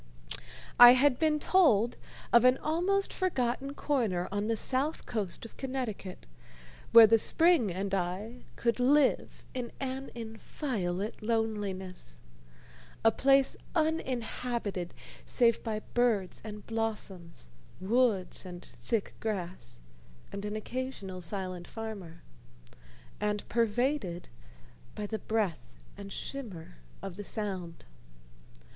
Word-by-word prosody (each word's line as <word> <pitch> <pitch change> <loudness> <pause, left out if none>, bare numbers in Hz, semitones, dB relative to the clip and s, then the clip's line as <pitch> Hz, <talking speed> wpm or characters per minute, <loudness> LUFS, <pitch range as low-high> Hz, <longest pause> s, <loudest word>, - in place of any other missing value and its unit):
I 245 0 +12
had 260 0 +4
been 310 -1 +3
told 245 - +4 0.4
of 235 0 +7
an 255 +1 +6
almost 360 +7 0
forgotten 275 -6 -1
corner 220 -12 0
on 205 +1 -1
the 230 - +1
south 275 +7 0
coast 210 -3 -3
of 230 - -12
Connecticut, 250 - -5 0.7
where 230 -1 +11
the 225 +1 +5
spring 325 - +4
and 195 +2 -3
I 195 +6 -3
could 235 +1 0
live 275 +2 +2
in 245 -2 -4
an 265 0 -4
inviolate 220 - -4
loneliness 205 - -3 0.9
a 225 - +7
place 270 +2 +3 0.2
uninhabited 245 - -1 0.3
save 235 -2 +3
by 215 -1 -2
birds 225 -6 +1
and 210 -1 -8
blossoms, 195 - -4 0.3
woods 210 -1 +1
and 180 -1 -9
thick 225 -4 -3
grass, 185 - -4 0.5
and 200 +1 -5
an 210 0 -3
occasional 215 -5 -5
silent 185 -1 -4
farmer, 200 -7 -7 1.0
and 210 0 -1
pervaded 235 -5 0 0.7
by 210 - -3
the 220 +1 -3
breath 210 -7 -1 0.3
and 200 0 -9
shimmer 200 - -6 0.3
of 195 -2 -6
the 205 - -5
Sound. 190 -5 -4
220 Hz, 110 wpm, -30 LUFS, 195-255 Hz, 1.0 s, I